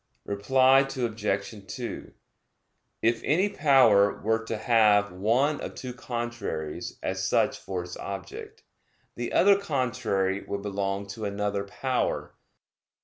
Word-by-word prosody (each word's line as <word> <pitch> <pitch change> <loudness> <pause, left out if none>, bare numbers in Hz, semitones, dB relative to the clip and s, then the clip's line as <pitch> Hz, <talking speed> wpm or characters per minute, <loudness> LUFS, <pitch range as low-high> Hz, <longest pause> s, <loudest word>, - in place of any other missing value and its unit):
Reply 130 +7 +4
Obj. 115 -6 -2
2: 120 +4 -6 0.9
If 115 +1 +2
any 185 +8 +2
power 125 - +4
were 110 +1 0
to 110 - -3
have 105 -3 +4
one 120 +11 +1
of - - -6
two 125 -1 -6
contraries 120 -11 -5
as - - -2
such - - +1
for 90 -2 -4
its 90 0 -8
object, 435 - -8 0.5
the - - -4
other 200 0 +5
contrary 120 - -1
would 100 0 -5
belong 100 0 -2
to 105 +2 -5
another 100 0 -2
power. 130 +5 -2
110 Hz, 120 wpm, -27 LUFS, 100-130 Hz, 0.9 s, other